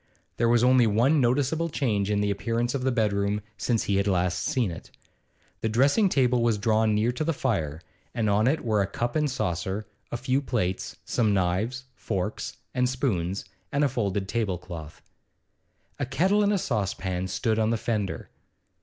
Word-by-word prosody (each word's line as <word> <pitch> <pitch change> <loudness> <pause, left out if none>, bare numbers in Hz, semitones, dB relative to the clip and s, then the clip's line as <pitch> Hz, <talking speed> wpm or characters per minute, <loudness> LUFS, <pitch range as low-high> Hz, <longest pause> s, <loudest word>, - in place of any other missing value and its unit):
There 115 0 +2
was 120 0 +4
only 125 -2 +5
one 125 +8 +3
noticeable 145 +7 +1
change 105 -9 0
in 105 -1 +1
the 105 0 +1
appearance 115 +4 -1
of 140 - -1
the 130 +1 +1
bedroom 105 -3 +1 0.2
since 115 -1 0
he 100 - +1
had 100 - +1
last 90 -3 +1
seen 125 - 0
it. 85 - -9 0.7
The 110 - -1
dressing 140 - +3
table 125 -5 +2
was 115 -2 +2
drawn 110 0 +2
near 110 +3 +2
to 125 +5 -3
the 165 +1 0
fire, 80 - -1 0.3
and 115 -2 -1
on 105 +3 +3
it 155 +2 +1
were 110 -3 +2
a 95 - 0
cup 120 +4 -3
and 150 -1 +2
saucer, 95 -3 -2 0.3
a 120 - -2
few 130 +2 0
plates, 95 -9 -2
some 110 -4 +1
knives, 100 +8 0
forks, 105 -3 -4 0.2
and 125 -1 +1
spoons, 100 -9 -1 0.3
and 140 +1 +1
a - - +5
folded 100 -6 -1
tablecloth. 90 -8 -4 1.0
A 135 - -1
kettle 190 +10 +2
and 205 0 +3
a 205 - +2
saucepan 95 - -2
stood 110 +4 0
on 110 0 +2
the 115 - +1
fender. 110 -4 -3
115 Hz, 180 wpm, -26 LUFS, 100-130 Hz, 1.0 s, only